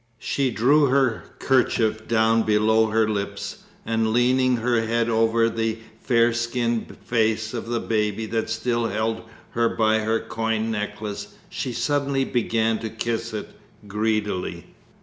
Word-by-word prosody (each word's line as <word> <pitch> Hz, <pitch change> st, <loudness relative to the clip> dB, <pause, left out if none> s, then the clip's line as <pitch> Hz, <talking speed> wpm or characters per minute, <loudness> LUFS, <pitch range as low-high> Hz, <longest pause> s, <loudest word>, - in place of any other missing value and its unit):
She 135 Hz, +3 st, -1 dB
drew 140 Hz, +6 st, +4 dB
her 130 Hz, -3 st, +1 dB
kerchief 110 Hz, -4 st, +1 dB
down 115 Hz, 0 st, +3 dB
below 110 Hz, +1 st, +3 dB
her 110 Hz, 0 st, +2 dB
lips, 100 Hz, -1 st, -4 dB, 0.3 s
and 110 Hz, -1 st, 0 dB
leaning 125 Hz, +1 st, +3 dB
her 120 Hz, 0 st, +1 dB
head 115 Hz, +1 st, 0 dB
over 115 Hz, 0 st, +3 dB
the 115 Hz, -1 st, -1 dB, 0.2 s
fair 115 Hz, -2 st, +3 dB
skinned 120 Hz, 0 st, -2 dB
face 110 Hz, -1 st, 0 dB
of 115 Hz, -2 st, -4 dB
the 120 Hz, 0 st, -1 dB
baby 105 Hz, -1 st, -1 dB
that 110 Hz, +1 st, -2 dB
still 120 Hz, 0 st, 0 dB
held 110 Hz, +1 st, -1 dB, 0.3 s
her 115 Hz, 0 st, +1 dB
by 110 Hz, 0 st, +2 dB
her 110 Hz, +1 st, 0 dB
coin 110 Hz, 0 st, -2 dB
necklace 105 Hz, -1 st, -5 dB, 0.2 s
she 130 Hz, -, -3 dB
suddenly 140 Hz, +1 st, 0 dB
began 115 Hz, -2 st, 0 dB
to 110 Hz, -, -4 dB
kiss 115 Hz, +1 st, -3 dB
it 105 Hz, -1 st, -5 dB, 0.4 s
greedily. 105 Hz, -2 st, -2 dB
115 Hz, 140 wpm, -23 LUFS, 110-120 Hz, 0.4 s, drew